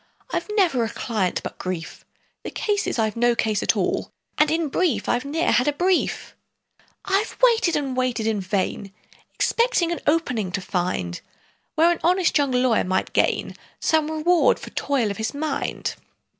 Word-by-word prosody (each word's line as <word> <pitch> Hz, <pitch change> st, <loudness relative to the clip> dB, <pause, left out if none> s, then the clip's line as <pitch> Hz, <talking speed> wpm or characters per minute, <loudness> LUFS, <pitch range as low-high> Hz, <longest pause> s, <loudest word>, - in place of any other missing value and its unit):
I've -, -, -2 dB
never 325 Hz, -, +3 dB
a 225 Hz, -, -2 dB
client 220 Hz, -5 st, -2 dB
but -, -, -7 dB
grief: 185 Hz, -3 st, -5 dB, 0.4 s
The -, -, -6 dB
case 410 Hz, -2 st, -1 dB
is, -, -, -2 dB
I've 220 Hz, -2 st, 0 dB
no 240 Hz, 0 st, +2 dB
case 215 Hz, -2 st, 0 dB
at -, -, +1 dB
all, -, -, -1 dB, 0.3 s
And 305 Hz, 0 st, +5 dB
in 325 Hz, 0 st, 0 dB
brief, 270 Hz, -, 0 dB
I've 245 Hz, +2 st, 0 dB
ne'er 315 Hz, +4 st, 0 dB
had 250 Hz, -, +3 dB
a 295 Hz, -, +2 dB
brief! 360 Hz, +4 st, 0 dB, 0.7 s
"I've 390 Hz, +3 st, 0 dB
waited 460 Hz, -8 st, +4 dB
and 275 Hz, -3 st, -2 dB
waited 250 Hz, -3 st, 0 dB
in 220 Hz, -2 st, 0 dB
vain, 195 Hz, +1 st, -2 dB, 0.4 s
Expecting 465 Hz, -8 st, +1 dB
an 345 Hz, -, -2 dB
'opening' 255 Hz, -, +1 dB
to 195 Hz, -, -1 dB
find, 175 Hz, -, -2 dB, 0.5 s
Where 330 Hz, +2 st, +5 dB
an 345 Hz, -, -1 dB
honest 360 Hz, +1 st, +2 dB
young 285 Hz, -2 st, +3 dB
lawyer 250 Hz, -2 st, +2 dB
might 185 Hz, +1 st, -1 dB
gain -, -, +1 dB, 0.2 s
Some 315 Hz, -1 st, +1 dB
reward 315 Hz, +2 st, +3 dB
for -, -, -10 dB
toil 255 Hz, -7 st, 0 dB
of 200 Hz, -, -6 dB
his 220 Hz, +5 st, -3 dB
mind. 310 Hz, +2 st, -2 dB
265 Hz, 170 wpm, -23 LUFS, 220-335 Hz, 0.7 s, And